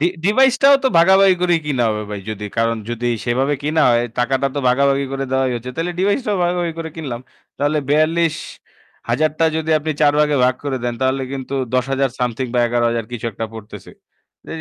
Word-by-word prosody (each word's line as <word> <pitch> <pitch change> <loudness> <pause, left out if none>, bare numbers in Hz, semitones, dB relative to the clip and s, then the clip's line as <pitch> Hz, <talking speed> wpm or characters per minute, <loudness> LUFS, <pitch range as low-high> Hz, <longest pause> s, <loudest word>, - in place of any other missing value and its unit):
D 160 - +3 0.2
ডিভাইসটাও 265 +6 +5
তো - - +5
ভাগাভাগি 190 +2 +5
করেই 175 -2 +2
কেনা 130 -5 0
হবে 105 0 -3
ভাই। 105 - -5
যদি 105 -1 -6
কারণ, 115 0 +1
যদি 120 +1 -3 0.2
সেভাবে 130 +4 0
কেনা 155 +1 +1
হয়, 120 0 +2
টাকাটা 135 +2 +1
তো 145 - -2
ভাগাভাগি 140 +2 +2
করে 135 0 -2
দেওয়াই 130 -1 +1
হচ্ছে। 120 +2 -7
তাহলে 170 +2 -2
ডিভাইসটাও 205 +2 0
ভাগাভাগি 175 -1 -1
করে 160 -1 -5
কিনলাম। 130 -7 -5 0.4
তাহলে 145 +2 +1
৳৪২,০০০ 155 -3 -1
টা 165 - +3
যদি 160 0 -2
আপনি 155 +1 -3
৪ 145 -1 +5
ভাগে 150 -1 +2
ভাগ 125 - +2
করে 135 -2 -2
দেন, 120 -1 -1
তাহলে 130 +1 0
কিন্তু 135 0 -5 0.2
৳১০,০০০ 135 +1 0
সামথিং 125 +1 -1
বা - - +2
৳১১,০০০, 120 -1 0
কিছু 120 -1 -4
একটা 115 - -4
পড়তেছে। 105 -2 -10 0.5
ত - - -23
140 Hz, 185 wpm, -19 LUFS, 120-160 Hz, 0.5 s, ডিভাইসটাও